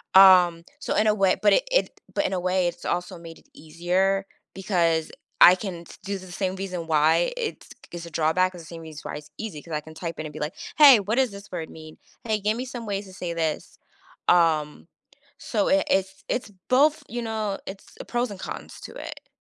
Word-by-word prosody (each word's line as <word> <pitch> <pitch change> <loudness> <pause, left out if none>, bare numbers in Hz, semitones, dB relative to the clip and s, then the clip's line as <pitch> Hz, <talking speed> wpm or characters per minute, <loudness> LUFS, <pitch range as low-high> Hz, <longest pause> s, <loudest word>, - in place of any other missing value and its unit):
Um, 180 -3 +7 0.2
so - - -2
in 215 - +3
a 215 - +5
way 195 -2 +3
but 205 - +5
it - - +4
it - - +1
but - - 0
in 190 - -1
a 185 - 0
way, 180 0 +1
it's 175 0 -6
also 180 +1 -2
made 165 -1 -11
it - - -27
easier 185 +5 0 0.3
because 170 -5 0 0.3
I 180 - +10
can 185 -3 -6
s - - -13
due 200 0 -3
to 185 - -11
the 180 - -12
same 190 0 -2
reason 185 -3 -5
why 160 +2 +3
it's 465 -3 -5
k - - -17
is 170 - -7
a 170 - -9
drawback 165 +4 +1
is 175 - -9
the - - -13
same 165 -1 -9
reason 155 -2 -10
why - - -5
it's 150 0 -12
easy 195 -10 -6
'cause 165 - -10
I 150 - -1
can 160 +1 -13
type 170 0 -6
in 155 - -4
and 150 - -8
be, 155 - -8
like, 150 +2 -3 0.2
"Hey, 280 -6 +9
what 205 +3 -1
does 260 -1 +2
this 200 0 -11
word 165 -3 -5
mean? 155 -1 -12 0.3
Hey, 220 -2 0
give 210 +2 0
me 250 - -3
some 245 -3 -7
ways 200 -1 -3
to 190 - -13
say 175 -2 -4
this." 160 -2 -3 0.5
Um, 160 -3 +2 0.5
so 210 -4 -1
it 290 +1 +3
it's 190 0 0
it's 240 -4 -2 0.2
both 295 +4 +4
you 240 +1 -4
know. 220 -3 -3
It's 195 0 -8 0.2
pros 240 0 -1
and 195 - -8
cons - - -7
to - - -9
it. - - -9
185 Hz, 230 wpm, -25 LUFS, 165-210 Hz, 0.5 s, I